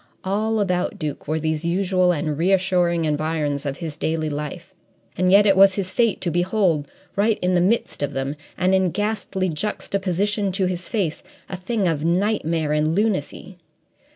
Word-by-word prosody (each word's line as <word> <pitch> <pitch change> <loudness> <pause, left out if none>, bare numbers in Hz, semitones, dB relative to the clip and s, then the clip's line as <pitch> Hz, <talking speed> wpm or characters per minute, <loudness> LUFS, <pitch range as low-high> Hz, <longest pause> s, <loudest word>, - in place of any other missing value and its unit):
All 215 +3 0
about 180 -3 0
Duke 150 -2 -5
were 155 +2 0
these 155 0 -2
usual 180 +1 +2
and 155 -2 -1
reassuring 180 -1 +2
environs 150 -2 -1
of 135 - -3
his 160 -4 -6
daily 155 -1 -1
life, 150 +5 -6 0.4
and 185 +1 +2
yet 205 +1 +7
it 195 -2 +5
was 195 0 +6
his 185 -2 -2
fate 230 +1 +1
to 175 - -1
behold, 175 -3 +1 0.2
right 210 +2 +2
in 180 0 +2
the 175 - +3
midst 205 0 0
of 145 0 -2
them, 135 +2 -2 0.2
and 185 +1 +2
in 190 -1 +3
ghastly 205 -1 -2
juxtaposition 200 +3 -1
to 190 0 +1
his 180 0 -3
face, 190 -9 -1 0.3
a - - -5
thing 195 +2 -1
of 155 -3 -1
nightmare 170 -3 0
and 155 +1 +1
lunacy. 195 -3 -2
180 Hz, 170 wpm, -22 LUFS, 155-195 Hz, 0.4 s, yet